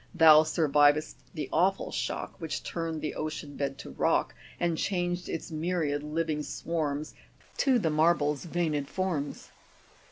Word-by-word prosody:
Thou 160 -3 +8
surviv'dst 150 -1 +3 0.2
the 150 -3 -3
awful 190 +4 +2
shock, - - -3
Which 160 - -3
turn'd 165 -2 -3
the 155 - -3
ocean 155 -2 -5
bed 140 -1 -2
to - - -9
rock, - - +1 0.3
And 170 -1 +1
changed 175 0 -1
its 165 - -4
myriad 155 -2 -1
living 155 0 -2
swarms. 155 -1 -3 0.4
To 265 -2 +3
the 170 -9 +1
marble's 150 -1 +2
veined 160 -5 -1
forms." 175 -7 -3
155 Hz, 135 wpm, -29 LUFS, 150-170 Hz, 0.4 s, Thou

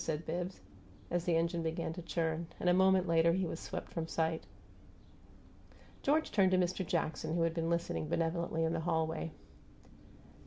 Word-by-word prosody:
said 160 0 -2
Bibbs, 175 +3 -3 0.5
as 175 0 0
the 170 - +2
engine 170 +1 +1
began 165 0 -2
to 175 - -6
churn; 165 -1 -1
and - - -1
a 180 - +6
moment 190 0 +4
later 165 0 +4
he 190 +1 +1
was 165 - -4
swept - - -6
from 165 -1 -3
sight. 160 0 -1 1.6
George 310 +3 +2
turned 195 -3 +4
to 185 - +3
Mist' 185 0 0
Jackson, 160 -1 -1
who 170 - +2
had 165 -1 +1
been 165 0 -1
listening 170 -2 -1
benevolently 165 0 0
in 160 0 +1
the 165 - 0
hallway. 160 -1 -1
170 Hz, 170 wpm, -34 LUFS, 160-180 Hz, 1.6 s, a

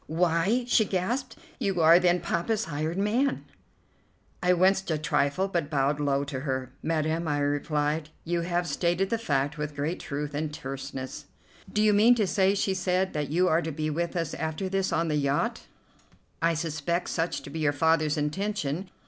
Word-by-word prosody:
"Why!" 175 +9 +1
she 235 -2 +4
gasped, 210 +7 -2 0.2
"you 195 -7 0
are, 165 +2 +7
then, 180 -1 +2
Poppa's 200 +6 -1
hired 155 +3 -3
man?" 230 +8 +1 1.0
I 180 - +3
winced 190 +2 +3
a 160 - +1
trifle, 150 +4 +1
but 170 -6 -2
bowed 145 0 +1
low 140 -1 +1
to 140 -2 -4
her. 130 -2 -3
"Madam," 160 +1 -1
I 145 -1 0
replied, 150 +1 0
"you 170 +1 -1
have 175 +1 -1
stated 175 +4 0
the 230 - +1
fact 145 -6 -1
with 150 -1 -4
great 150 +5 -2
truth 145 +1 -4
and 150 +1 -2
terseness." 135 -1 -6 0.5
"Do 210 - +2
you 210 -1 +5
mean 225 +4 +6
to 220 -3 +2
say," 195 +1 +2
she 195 -1 +1
said, 185 0 0
"that 150 -1 -2
you 180 +4 +2
are 165 -1 +3
to 160 - -3
be 155 +1 -2
with 170 +4 -2
us 165 -3 -2
after 160 +5 -3
this 195 0 0
on 165 +1 +1
the 150 -1 +1
yacht?" 140 0 -1 0.7
"I 165 0 +2
suspect 165 +2 -2
such 165 +1 -1
to - - -9
be 160 - -5
your 155 -2 +2
father's 155 +1 +2
intention." 175 +2 -2
165 Hz, 180 wpm, -27 LUFS, 150-185 Hz, 1.0 s, are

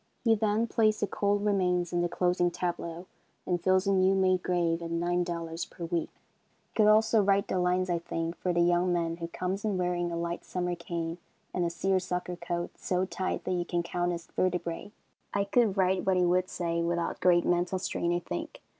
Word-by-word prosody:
He 230 -2 +5
then 215 +1 +1
plays 215 -2 +2
the - - +1
cold 205 0 0
remains 180 -4 +1
in 175 - +2
the 175 - 0
closing 180 0 +1
tableau, 175 0 -4 0.4
and 175 -1 0
fills 185 +2 +3
a 195 - +2
new 190 0 +4
made 185 -1 +3
grave 170 -2 0
at 165 - -5
$9 170 -1 -2
per 170 - -7
week. 170 0 -1
I - - -39
could 215 -2 +4
also 220 +1 +5
write 200 0 +2
the 185 - 0
lines, 180 +1 +1
I 175 -2 0
think, 165 0 -3
for 180 - -1
the 175 0 +2
young 175 +1 +3
man 165 -1 0
who 170 -1 -4
comes 185 +3 -3
in 210 -3 0
wearing 175 -1 0
a 170 - -3
light 170 +1 -3
summer 180 -1 -2
cane 170 -1 -4 0.3
and 180 - 0
a - - +1
seersucker 180 0 -1
coat 175 0 -3
so 185 0 0
tight 190 0 -3
that 185 - -3
you 175 -1 0
can 175 0 -1
count 175 +1 -1
his 170 -1 -5
vertebrae. 180 +1 -2 0.4
I 200 - +2
could 205 0 +2
write 185 -1 +2
what 190 -1 +2
he 180 - +3
would 180 +1 +2
say 170 -1 -1
without 170 0 -1
great 175 -1 +4
mental 175 +1 +1
strain, 175 -2 -1
I 175 - +2
think. 85 - -5
180 Hz, 210 wpm, -29 LUFS, 170-190 Hz, 0.4 s, He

